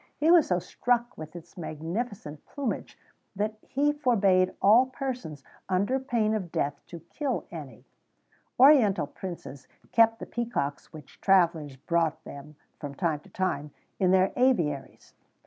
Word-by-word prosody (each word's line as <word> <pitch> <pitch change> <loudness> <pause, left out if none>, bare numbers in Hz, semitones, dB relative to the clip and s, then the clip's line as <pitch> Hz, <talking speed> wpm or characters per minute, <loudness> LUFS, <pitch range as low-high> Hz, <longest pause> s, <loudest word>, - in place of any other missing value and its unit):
He 315 +2 +3
was 345 -4 +6
so 180 - +2
struck 240 +7 -1
with 155 +1 -10
its 175 - -12
magnificent 165 - -5
plumage 275 -5 -4 0.4
that 215 +2 -2
he 290 +2 0
forbad 200 -10 +2
all 230 +6 +6
persons, 250 - -5 0.3
under 200 +8 +1
pain 235 -5 0
of 190 -6 -3
death, 145 - -2
to 170 -2 -9
kill 260 - -3
any.[XVII 145 -9 -9 0.7
115] - - -43
Oriental 215 - +5
princes 170 -4 -9 0.2
kept 225 0 +4
the - - -7
peacocks 230 -12 -3
which 155 -2 -14
travellers 170 -7 +2
brought 160 +2 -1
them, 145 +2 -11 0.2
from 145 -2 -7
time 160 -2 -1
to - - -19
time, 150 -6 -2 0.3
in 185 - +3
their 190 +1 +3
aviaries. 165 - 0
185 Hz, 145 wpm, -27 LUFS, 155-240 Hz, 0.7 s, was